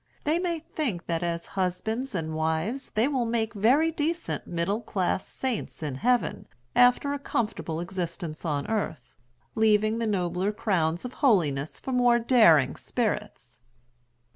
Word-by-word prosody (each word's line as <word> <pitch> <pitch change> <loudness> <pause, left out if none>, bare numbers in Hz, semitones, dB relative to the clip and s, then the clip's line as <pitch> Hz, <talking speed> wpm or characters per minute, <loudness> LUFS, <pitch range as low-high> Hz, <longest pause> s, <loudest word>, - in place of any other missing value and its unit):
They 310 +3 +1
may 350 -2 -1
think 280 - -4
that 165 0 -1
as 170 -1 -2
husbands 200 +7 -2
and 160 -2 -2
wives 160 +12 -1
they 220 +4 +3
will 270 -4 0
make 230 -1 -1
very 260 +10 +3
decent 325 +2 -2
middle 175 +6 -1
class 190 -4 -1
saints 250 -10 -4
in 145 -3 -2
heaven, 245 - 0 0.3
after 250 +3 +4
a 285 - -3
comfortable 215 - -2
existence 170 -2 -5
on 145 -4 -1
earth, 180 - -3 0.4
leaving 215 0 +3
the 230 - 0
nobler 185 -1 0
crowns 185 -5 0
of 250 - -6
holiness 160 - +2
for 265 - -5
more 245 -1 +4
daring 220 - +5
spirits. 210 - -3
210 Hz, 140 wpm, -27 LUFS, 170-245 Hz, 0.4 s, daring